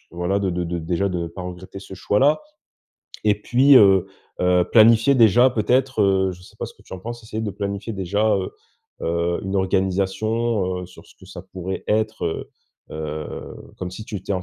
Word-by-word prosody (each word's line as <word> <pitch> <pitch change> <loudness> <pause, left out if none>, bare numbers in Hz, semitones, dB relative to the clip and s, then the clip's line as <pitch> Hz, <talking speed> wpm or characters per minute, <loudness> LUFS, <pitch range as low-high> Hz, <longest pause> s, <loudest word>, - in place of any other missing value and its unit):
voilà 90 +3 -1
de 95 -2 0
de 90 0 -2
de 85 +1 -3
déjà 85 +4 -1
de 90 -2 -3
ne 85 - -3
pas 90 +3 -8
regretter 90 +2 -8
ce 95 - -10
choix-là. 120 - +2 0.8
Et 105 - +4
puis, 135 +5 +5
heu 95 -5 +6 0.3
heu, 90 0 +3
planifier 115 +4 +6
déjà 120 +1 +6
peut-être, 125 +1 +1
heu, 95 -1 +2
je 90 0 -13
sais - - -17
pas - - -3
ce - - -13
que - - -22
tu - - -15
en - - -7
penses, 120 +3 -7
essayer 110 0 -5
de 105 - -2
planifier 100 +2 -4
déjà, 100 +3 +1
heu 95 - -3 0.5
heu, 85 +1 -1
une 95 +1 -2
organisation, 95 +1 0
heu, 90 - -8
sur 90 - -16
ce - - -19
que - - -15
ça - - -9
pourrait 95 0 -6
être 110 +1 0
heu 80 - -4 0.4
heu, 75 -1 -6 0.2
comme 90 - -4
si 100 +4 -8
tu 105 - -6
étais 100 +1 -4
en 90 - -3
95 Hz, 205 wpm, -22 LUFS, 90-110 Hz, 0.8 s, heu